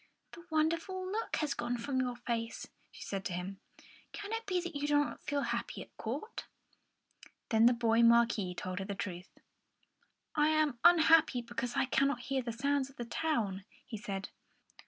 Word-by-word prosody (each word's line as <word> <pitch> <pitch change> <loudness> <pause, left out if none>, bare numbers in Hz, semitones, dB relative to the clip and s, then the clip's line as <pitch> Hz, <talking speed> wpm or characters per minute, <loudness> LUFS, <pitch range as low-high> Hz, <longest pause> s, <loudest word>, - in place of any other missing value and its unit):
"The 340 - -11
wonderful 330 +4 0
look 445 +2 -2
has 300 -2 0
gone 240 +1 -2
from 260 +3 -2
your 250 -1 -2
face," 230 -1 -3 0.2
she - - -11
said 195 -1 -4
to 180 - -2
him. 185 +2 -5 0.5
"Can 410 +1 -7
it 455 0 -3
be 365 -2 +1
that 350 -2 -5
you 285 0 -1
do 295 0 +4
not 290 - 0
feel 285 -1 -1
happy - - -3
at - - -23
court?" 280 - -5 1.0
Then 225 +1 +6
the 245 - +6
boy 230 -1 +3
Marquis 230 -5 +4
told 185 +1 -4
her 195 - -3
the 200 0 -4
truth. 180 -2 -5 1.0
"I 300 -1 +3
am 310 -5 +2
unhappy 320 -7 +6
because 240 +1 -4
I - - +3
cannot 270 -1 +1
hear 265 +2 -1
the 240 -1 -4
sounds 275 +3 0
of 275 - -18
the 240 - -5
town," 225 -8 -1 0.2
he 260 -4 -7
said. 200 -2 -5
250 Hz, 180 wpm, -33 LUFS, 230-310 Hz, 1.0 s, Then